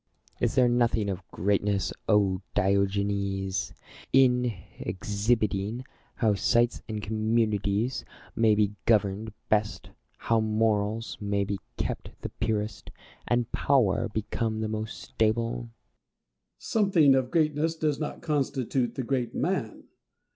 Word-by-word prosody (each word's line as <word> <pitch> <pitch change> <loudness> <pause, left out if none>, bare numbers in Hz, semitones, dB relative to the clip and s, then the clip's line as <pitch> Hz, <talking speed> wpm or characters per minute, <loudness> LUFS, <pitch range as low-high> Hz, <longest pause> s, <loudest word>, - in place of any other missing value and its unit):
Plato. - - +2
Is - - -1
there 125 -1 +5
nothing 120 -3 +2
of 95 -1 -7
greatness, 100 +1 0 0.6
Diogenes! 100 -1 0 0.4
in 125 -2 +4 0.3
exhibiting 105 +3 -1 0.3
how 110 -3 +2
cities 120 +4 +2
and 105 -1 -4
communities 110 +1 0 0.3
may 110 -2 +4
be 105 -1 +2
governed 105 0 +2 0.2
best, 105 0 0 0.3
how 115 -1 +1
morals 110 0 0
may 100 -1 0
be 100 0 -3 0.2
kept - - -4
the - - -4
purest, 110 -2 -3 0.4
and 120 -1 +1
power 115 -5 +2
become 110 +1 -2
the 110 - -1
most 110 0 -4
stable? 115 +1 0
Diogenes. 120 -1 -6 0.9
Something 190 -10 +3
of 130 -1 +1
greatness 155 +1 +1
does 155 -3 0
not 150 - -5
constitute 135 -4 0
the 130 - -2
great 125 -1 -1
man. 155 - -2
110 Hz, 120 wpm, -27 LUFS, 105-125 Hz, 0.9 s, there